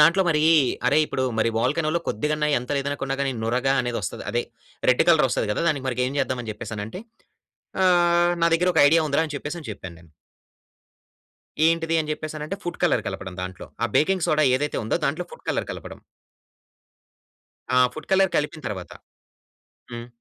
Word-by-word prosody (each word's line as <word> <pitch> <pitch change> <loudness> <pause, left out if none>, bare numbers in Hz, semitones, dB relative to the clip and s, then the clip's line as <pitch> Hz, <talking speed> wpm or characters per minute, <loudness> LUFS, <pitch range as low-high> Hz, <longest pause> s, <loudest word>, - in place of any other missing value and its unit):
దాంట్లో 170 +5 +6
మరీ 150 -2 +2 0.4
అరే 140 +4 +4
ఇప్పుడు 130 - -2 0.2
మరి 110 - +3
వోల్కనో‌లో 155 +7 +1
కొద్దిగన్నా 150 +7 0
ఎంత 125 +3 -9
లేదనుకున్నా 140 -1 -2
గానీ 135 -1 0
నురగా 125 +4 +1
అనేది 120 -1 -2
వస్తది. - - -5
అదే 120 +1 0 0.5
రెడ్ 125 - +5
కలర్ 160 -5 +6
వస్తది 110 - -1
గదా! 105 - -1
దానికి 140 -4 -1
మరిక 125 -1 -2
ఏం 135 - -6
చేద్దాం 130 -2 -1
అని 115 - -6
చెప్పేసి 110 +1 -7
అని 105 - -3
అంటే. 145 +12 -8 0.8
ఆహ్, 175 -1 +4
నా - - +5
దగ్గర 180 +2 +1
ఒక 160 - +4
ఐడియా 160 +2 +4
ఉందిరా 145 +2 +2
అని 150 - -7
చెప్పేసి 150 +3 -6
చెప్పాను 90 -4 -9
నేను. 80 -2 -20 1.6
ఏంటిది 165 0 +1
అని 155 -1 -4
చెప్పేసి 155 0 -6
అనంటే 155 +6 -5
ఫుడ్ 175 - -5
కలర్ - - +2
కలపడం 95 0 -6
దాంట్లో. 90 0 -7 0.2
ఆ - - +3
బేకింగ్ 185 +2 +2
సోడా 155 0 +3
ఏదైతే 145 +2 -2
ఉందో 110 - 0
దాంట్లో - - -2
ఫుడ్ - - -13
కలర్ - - -1
కలపడం. - - -8 1.8
ఆ - - +6 0.2
ఫుడ్ 155 - -9
కలర్ 190 -1 +4
కలిపిన 150 +1 -1
తర్వాత. 95 -4 -7 1.0
హ్మ్. 120 0 -6
150 Hz, 175 wpm, -24 LUFS, 120-165 Hz, 1.8 s, దాంట్లో